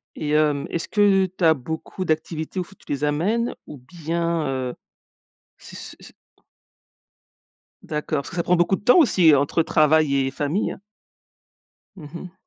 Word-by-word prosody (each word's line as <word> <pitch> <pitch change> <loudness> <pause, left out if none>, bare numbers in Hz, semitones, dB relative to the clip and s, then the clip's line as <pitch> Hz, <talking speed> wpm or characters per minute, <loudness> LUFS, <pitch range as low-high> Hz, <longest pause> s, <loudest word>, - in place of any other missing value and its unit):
Et 150 - -4
hem, 150 -2 +1
est-ce 165 - -4
que 200 -2 +3
tu 185 -1 -5
as 160 -1 +6
beaucoup 160 +6 -6
d'activités 160 +1 -3
où - - +1
il 175 - -10
faut 195 - -17
que - - -25
tu - - -5
les 145 +1 -2
amènes? 200 +12 0
Ou 145 - -10
bien, 165 +3 -3
heu, 130 -2 -3 0.8
c' - - -13
c' - - -10
c' - - -14 1.7
D'accord, 150 0 -3
parce 140 - -6
que - - -9
ça 170 - -1
prend 180 - +2
beaucoup 175 +2 +2
de - - -12
temps 250 - +5
aussi 180 - +5
entre 140 +4 +1
travail 155 -2 +3
et 135 -1 0
famille. 150 +8 -2 1.2
Mmh 150 -5 -10
mh. 175 +1 -8
160 Hz, 175 wpm, -22 LUFS, 150-180 Hz, 1.7 s, as